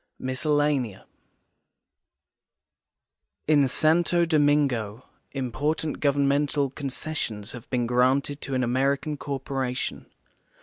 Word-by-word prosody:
MISCELLANEA 135 -4 0 2.4
In 145 -3 +5
Santo 170 +5 +3
Domingo 145 -8 +1 0.3
important 145 +4 -2
governmental 140 0 +1
concessions 135 -6 -4
have 120 -1 -10
been 125 -2 0
granted 130 +4 +1
to 135 - -3
an 130 - +1
American 135 +5 0
corporation. 135 -2 -3
140 Hz, 80 wpm, -26 LUFS, 125-150 Hz, 2.4 s, In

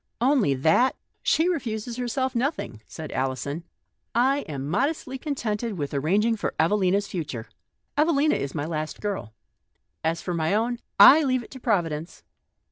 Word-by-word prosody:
" - - -50
Only 200 - +2
that? 160 - +3 0.3
She 325 - +3
refuses 240 -8 -2
herself 250 +1 -1
nothing," 240 - -2
said 155 -2 -8
Alison. 135 +5 -2 0.3
" - - -50 0.2
I 280 - -1
am 140 -2 -4
modestly 265 - -1
contented 230 - -2
with 145 -2 -3
arranging 200 +11 +2
for - - -3
Evelina's 195 +3 +2
future. 150 - -5 0.5
Evelina 300 0 +3
is 140 +2 -3
my 145 -2 -2
last 155 -1 -4
girl. 195 - -4 0.7
As 165 +1 0
for 180 - -4
my 165 +3 +1
own, 235 +2 0 0.2
I 305 +3 +10
leave 255 -3 +1
it - - -15
to 260 - -9
Providence." 170 - -1
205 Hz, 155 wpm, -25 LUFS, 155-255 Hz, 0.7 s, I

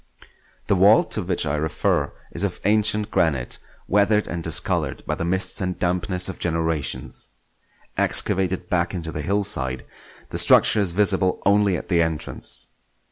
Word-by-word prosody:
The - - +1
vault 100 +4 +4
to 105 - +1
which 90 -2 -2
I 75 -1 -2
refer 75 +1 -1 0.2
is - - -3
of - - -3
ancient 105 0 0
granite, 70 -7 0 0.3
weathered 105 +2 +2
and 85 -1 -5
discoloured - - -1
by - - -2
the - - -4
mists 95 +2 0
and 90 -1 -3
dampness 90 +1 0
of 95 - -6
generations. 80 -4 -2 0.7
Excavated 95 -1 +3
back 90 +1 -1
into 80 -2 -5
the 75 - -5
hillside, 75 -8 0 0.5
the - - +3
structure 110 - +5
is 95 -5 +1
visible 95 -1 +2
only 100 -2 +2
at - - -9
the 85 -3 +2
entrance. 80 -2 -2
90 Hz, 150 wpm, -22 LUFS, 80-100 Hz, 0.7 s, structure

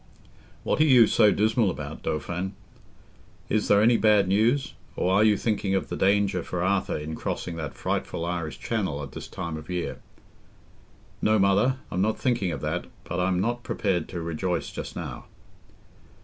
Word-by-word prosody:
"What - - +1
are - - +8
you 130 -6 +7
so 105 -1 +4
dismal 110 +1 +2
about, - - -6
Dauphin? 90 +5 -3 1.0
Is 110 -1 +1
there 100 0 +5
any 115 +1 +5
bad 105 -3 +4
news? 115 +8 +2 0.2
Or 95 - +1
are 100 +2 +5
you 105 -2 +4
thinking 100 -3 0
of 95 - -1
the - - -3
danger 100 -2 +2
for 85 +1 -3
Arthur 95 +1 +1
in 75 +1 -5
crossing 85 +1 -4
that 80 -4 -5
frightful 85 - -2
Irish 85 -2 -3
Channel 95 -11 -2
at 70 - -8
this - - -8
time 85 -4 -5
of 80 +1 -10
year?" 90 -1 -3 1.2
"No, 110 0 +3
Mother, 100 +7 +3
I'm 90 - 0
not 110 +2 +1
thinking 120 -8 0
of - - -5
that; - - -2 0.2
but 90 - -4
I'm 90 0 +1
not 120 +5 -1
prepared 95 -8 -1
to 85 - -5
rejoice 85 +2 -2
just - - -7
now." - - -6
95 Hz, 175 wpm, -26 LUFS, 90-110 Hz, 1.2 s, are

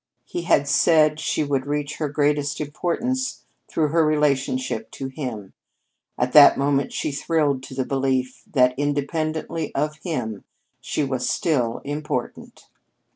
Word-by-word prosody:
He 175 - -4
had 140 -5 +3
said 155 +1 +4
she 155 - 0
would 140 -2 -1
reach 145 0 -2
her 155 -2 -2
greatest 145 0 0
importance 235 - -2 0.2
through 155 -2 0
her 165 +2 +3
relationship 150 - 0
to 135 -1 -5
him. 125 -8 -6 0.6
At 125 +1 0
that 145 -2 +9
moment 140 0 +1
she 155 - -2
thrilled 145 -2 0
to 130 - -10
the 130 -1 -1
belief 130 -1 -1
that, 125 -3 +4
independently 155 +2 -2
of 150 +2 -1
him, 120 - -4 0.4
she 150 - -2
was 130 -2 -1
still 125 -8 0
important. 145 -3 -5
145 Hz, 135 wpm, -23 LUFS, 135-155 Hz, 0.6 s, that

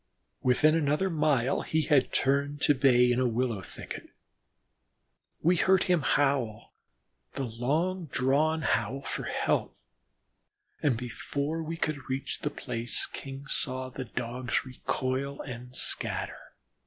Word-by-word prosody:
Within 140 +5 +4
another 160 +4 +1
mile 140 -5 +2
he 160 0 0
had 140 -2 +3
turned 140 +2 +1
to 145 - +5
bay 125 -3 +5
in 120 - +2
a 130 - +3
willow 120 -3 0
thicket. - - -8 1.3
We 175 +3 +4
heard 190 +1 +4
him 180 -3 +2
howl 135 -7 +1 0.6
the 135 - -2
long 155 +10 -1
drawn 150 +5 +2
howl 120 +2 0
for - - -4
help, - - 0 1.0
and 135 -6 +2
before 140 +6 -3
we 165 +1 -4
could 155 -5 -3
reach 130 +1 -2
the - - -1
place 115 +1 -2
King 135 0 -8
saw 130 -1 -1
the 130 0 -6
Dogs 125 +2 -2
recoil 130 +2 -2
and 125 -1 -8
scatter. - - -1
135 Hz, 130 wpm, -29 LUFS, 125-150 Hz, 1.3 s, to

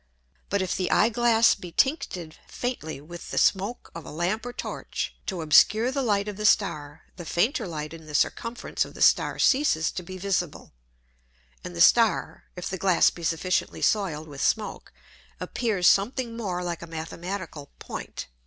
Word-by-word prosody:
But 200 -1 +1
if 185 - -2
the 185 - -1
Eye 215 - +4
Glass 235 -1 +4
be 180 -3 -9
tincted 180 - 0
faintly 200 - -4
with 170 +3 -10
the - - -5
Smoak 200 +5 +1
of 165 - -8
a - - -10
Lamp 185 +9 -2
or - - -4
Torch, - - -5
to 180 -4 -3
obscure 215 +10 +5
the 275 +1 -1
Light 205 -4 +1
of 205 -2 -5
the 210 - -3
Star, 150 -9 0
the 175 - -7
fainter 215 - 0
Light 155 -2 -5
in 160 -1 -11
the 150 - -6
Circumference 230 +9 -1
of - - -11
the - - +1
Star - - +4
ceases 260 - +3
to - - -5
be 185 +1 -9
visible, 180 -4 -2 0.9
and 90 - -7
the 85 - -1
Star 230 -2 +4
(if 180 - -5
the 190 - -4
Glass 185 -1 +4
be 175 - -11
sufficiently 170 +3 -1
soiled 165 -8 0
with 140 -2 -8
Smoak) 220 -1 -1 0.5
appears 210 -7 0
something 230 +3 +2
more 185 -6 -3
like 175 -1 -4
a 170 - -8
mathematical 165 -1 -6
Point. - - -7
185 Hz, 175 wpm, -26 LUFS, 165-220 Hz, 0.9 s, obscure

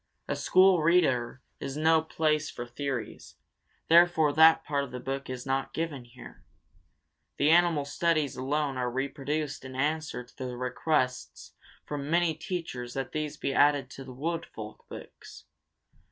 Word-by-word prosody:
A - - -1
school 185 -2 +4
reader 135 -7 +2 0.2
is 140 +1 -5
no 160 +1 +4
place 155 -1 0
for 120 - -6
theories; 125 0 -5 0.5
therefore 165 -3 +5
that 160 +1 +6
part 140 -1 0
of 140 - -7
the 125 0 -6
book 135 +2 -5
is 125 -1 -6
not 135 0 -2
given 155 -6 -3
here. 60 - -14 0.9
The 145 +2 +3
animal 170 -4 +4
studies 155 -1 0
alone 140 +1 -1
are 125 -1 -1
reproduced 140 +3 -3
in 130 0 -9
answer 150 -1 -1
to 125 - -23
the 125 -3 -6
requests 125 +1 -2 0.3
from 145 -1 -5
many 170 0 +2
teachers 155 -7 -5
that 135 -1 -3
these 155 -1 -3
be 135 - -2
added 145 -3 +3
to 135 - -9
the 130 - -10
Wood 165 +6 -3
Folk 110 -1 -10
books. - - -11
145 Hz, 155 wpm, -28 LUFS, 130-160 Hz, 0.9 s, that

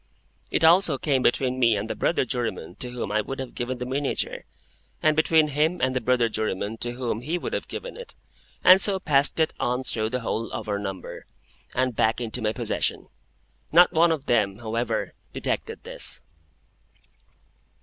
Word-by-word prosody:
It - - 0
also 165 -2 +5
came 135 -2 +1
between 130 +1 +1
me 115 -4 +4
and 105 +2 -3
the - - -2
brother 165 - +1
juryman 115 -9 -3
to 125 - -3
whom 120 -4 -4
I 110 0 +2
would 135 +5 -6
have 130 -3 -6
given 125 +1 -3
the 125 - -4
miniature, 135 +2 -2 0.5
and 155 0 +3
between 155 0 +4
him 155 +5 +1
and 130 0 0
the 130 - 0
brother 125 -2 +2
juryman 110 -1 -3
to 120 +1 -1
whom 120 -3 -3
he 160 +8 -2
would - - -5
have - - -3
given - - -7
it, 485 0 -10 0.5
and 185 +1 +8
so 200 -2 +1
passed 145 -2 +2
it 160 - +2
on 125 +2 0
through 110 -3 -2
the 125 +1 -2
whole 115 0 -3
of - - -5
our 100 -1 -1
number, 95 -3 -7 0.5
and 130 -1 0
back 110 +2 +2
into 120 0 -3
my 110 -1 +1
possession. - - -2 0.6
Not 175 +2 +6
one 165 +1 +4
of 150 -4 -2
them, 105 -6 +2
however, 115 0 -2 0.2
detected - - -3
this. - - +1
125 Hz, 180 wpm, -25 LUFS, 115-150 Hz, 0.6 s, and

